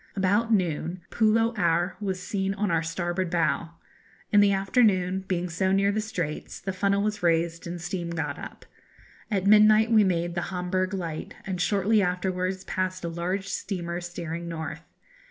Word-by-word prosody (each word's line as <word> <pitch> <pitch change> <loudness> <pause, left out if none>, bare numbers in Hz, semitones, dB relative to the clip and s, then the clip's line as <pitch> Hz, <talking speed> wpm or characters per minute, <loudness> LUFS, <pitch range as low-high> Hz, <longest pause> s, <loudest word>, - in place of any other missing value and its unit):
About 205 +4 +2
noon 175 -3 0
Pulo 225 +1 +3
Aor 175 +1 +2
was 190 -2 -2
seen 195 0 -2
on 205 -2 0
our 165 -1 +2
starboard 175 +2 -2
bow. 170 -1 0 0.6
In 205 - +6
the 205 -1 +5
afternoon, 195 -2 +2
being 180 -1 -1
so 190 +3 0
near 200 +1 +3
the 215 +1 0
Straits, 175 -8 -4
the 190 - -4
funnel 200 +1 +1
was 210 -1 -2
raised 170 0 +1
and 175 +1 -5
steam 175 0 -4
got 170 - -3
up. - - -9 0.6
At 195 -4 0
midnight 215 +2 +6
we 215 -2 +6
made 175 -2 0
the 175 0 -3
Homburgh 185 +1 -1
Light, 165 -4 -5
and 185 -2 -3
shortly 205 +2 +3
afterwards 185 0 -1
passed 185 -1 -2
a - - -2
large 180 +4 -3
steamer 175 -3 -3
steering 170 -1 -5
north. 160 -1 -5
185 Hz, 165 wpm, -26 LUFS, 175-200 Hz, 0.6 s, In